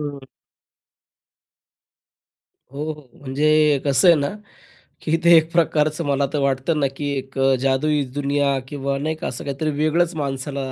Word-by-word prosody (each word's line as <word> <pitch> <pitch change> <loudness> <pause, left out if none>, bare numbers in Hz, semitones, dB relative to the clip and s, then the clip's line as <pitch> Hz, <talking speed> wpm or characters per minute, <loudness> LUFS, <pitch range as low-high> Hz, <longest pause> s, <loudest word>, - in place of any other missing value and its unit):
हं. 145 -2 -6 2.5
हो, 145 +2 -5
हो. 150 -4 -15
म्हणजे 150 +2 +2
कसं 140 +6 +3
आहे 170 - +8
ना 140 - 0 0.7
की 165 +1 0
ते 170 0 +7
एक 160 +1 +1
प्रकारचं 155 -1 +1
मला 140 0 +1
तर 150 - 0
वाटतं 140 +3 0
ना 140 - +2
की 145 -1 -3
एक 135 0 -8
अ, 135 0 +3
जादुई 140 +3 +1
दुनिया 140 -1 0
किंवा 140 -1 -3
नाही 155 +3 -2
का, - - -5
असं 125 - -6
काहीतरी 140 +2 -3
वेगळंच 165 +3 +1
माणसाला 140 -1 -4
145 Hz, 150 wpm, -21 LUFS, 135-155 Hz, 2.5 s, आहे